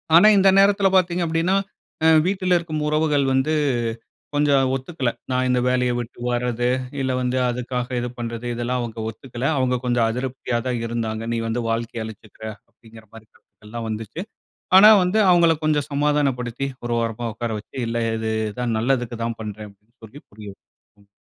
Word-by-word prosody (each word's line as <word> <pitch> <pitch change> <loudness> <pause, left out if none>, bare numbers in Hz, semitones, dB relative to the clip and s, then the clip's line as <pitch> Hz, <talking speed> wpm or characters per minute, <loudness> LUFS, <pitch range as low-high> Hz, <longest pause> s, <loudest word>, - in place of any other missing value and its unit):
ஆனா 175 +5 +8
இந்த 195 - +4
நேரத்தில 200 0 +4
பாத்தீங்க 180 -1 +1
அப்படின்னா, 165 +4 +1 0.5
அ - - +7 0.2
வீட்டில 185 -1 +1
இருக்கும் 155 -3 -4
உறவுகள் 150 -2 +2
வந்து, 130 +4 +1 0.8
கொஞ்சம் 140 -3 +3
ஒத்துக்கலை. 135 -2 -2 0.2
நான் 130 0 +1
இந்த 125 0 +2
வேலையை 125 -1 +1
விட்டு 120 0 -8
வரது, 120 0 -1 0.3
இல்ல 130 -1 0
வந்து 125 0 -1
அதுக்காக 125 0 -3
இது 120 - -2
பண்றது, 115 0 -5
இதெல்லாம் 120 +2 -2
அவுங்க 115 -1 -6
ஒத்துக்கல. 120 +3 -7
அவுங்க 130 -1 +1
கொஞ்சம் 120 -2 +2
அதிருப்தியா 125 0 -3
தான் 120 -2 -1
இருந்தாங்க. 115 -1 -3
"நீ - - -1
வந்து 115 +2 -1
வாழ்க்கைய 115 0 -2
அழிச்சுக்குற." 110 0 -12 0.3
அப்டிங்குற 110 0 -17
மாரி 110 -1 -13
கருத்துக்கள் 105 - -23
எல்லாம் 115 0 -5
வந்துச்சு. 110 - -5 0.5
ஆனா, 210 +3 +10
வந்து 180 +5 +1
அவுங்கள 170 -2 +5
கொஞ்சம் 150 -2 +1
சமாதானப்படுத்தி, 140 -3 0 0.2
ஒரு 120 0 -1
ஓரமா 115 +1 -3
உக்கார 115 +1 -4
வச்சி, 105 - -13
இல்லை 115 0 -1 0.2
இது 110 0 -2 0.3
தான், 120 -2 -1
நல்லதுக்கு 120 -1 0
தான் 115 0 -3
பண்றேன் 105 0 -7
அப்படி 100 +1 -24
என்று 120 +2 -43
சொல்லி 135 +7 -13
புரிய 105 0 -11
வ, - - -74 0.4
ம். - - -31
125 Hz, 170 wpm, -22 LUFS, 115-145 Hz, 0.8 s, ஆனா